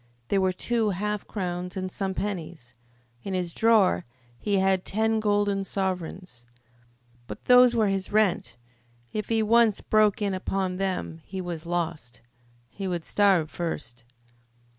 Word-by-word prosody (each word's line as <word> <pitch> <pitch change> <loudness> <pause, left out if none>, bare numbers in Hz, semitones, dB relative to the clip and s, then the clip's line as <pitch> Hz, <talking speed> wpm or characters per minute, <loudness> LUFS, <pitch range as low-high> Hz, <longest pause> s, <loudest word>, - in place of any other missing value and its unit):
There 195 - +2
were 190 0 +2
two 225 +4 0
half 210 +2 -2
crowns 180 -1 -4
and 185 0 -3
some 190 0 -3
pennies. 170 - -5 0.5
In 195 - -3
his 175 -2 -2
drawer 215 - +3 0.4
he 205 -2 0
had 190 -1 +2
ten 220 +2 0
golden 205 -2 +1
sovereigns. 185 -8 -4 0.8
But - - -9
those 250 -1 +7
were 220 -2 +3
his 195 -1 -2
rent. 205 - +1 0.6
If 215 -1 -3
he 225 -1 +2
once 225 -1 +4
broke 215 -2 +3
in 200 -2 0
upon 185 0 -2
them 185 -4 -3
he 190 - -7
was 170 -2 -5
lost. 165 -9 -3 0.5
He 195 -1 -5
would 175 -3 -3
starve 190 -6 +3
first. 120 -9 -5
190 Hz, 140 wpm, -26 LUFS, 175-210 Hz, 0.8 s, those